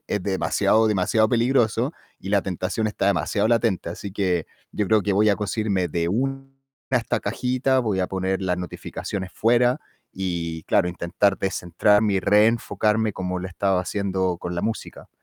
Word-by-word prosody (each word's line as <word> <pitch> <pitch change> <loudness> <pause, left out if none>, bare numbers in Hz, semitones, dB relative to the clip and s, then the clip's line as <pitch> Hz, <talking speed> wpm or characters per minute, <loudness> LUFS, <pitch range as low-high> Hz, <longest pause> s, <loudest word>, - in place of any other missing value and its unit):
es 105 - -1
demasiado, 105 +3 +2
demasiado 110 +2 +2
peligroso 120 +1 +2 0.3
y 95 - -9
la 100 -2 +3
tentación 95 +4 -2
está 100 -2 -2
demasiado 100 +2 +1
latente, 115 -7 +1
así 100 +2 -7
que 90 -5 0 0.3
yo 105 - -1
creo 110 +1 +3
que 100 - 0
voy 105 +2 +4
a 100 - +2
cosirme 105 -3 -1
de 85 +1 -1
una 135 +7 -1 0.5
de 125 - +3
estas 115 - -2
cajitas, 130 +4 0
voy 105 -5 0
a 90 - +1
poner 95 0 -2
las 90 -1 0
notificaciones 90 +2 -5
fuera 120 +2 +2 0.3
y 85 -4 -3
claro, 90 - +2
intentar 90 +3 0
descentrarme 100 +3 +2
y 95 - +1
reenfocarme 110 +1 +2
como 90 -1 -3
lo 90 - -5
he - - -9
estado 95 +1 +1
haciendo 95 -1 -1
con 90 0 -5
la - - 0
música, 115 -1 -5
100 Hz, 170 wpm, -23 LUFS, 90-110 Hz, 0.5 s, voy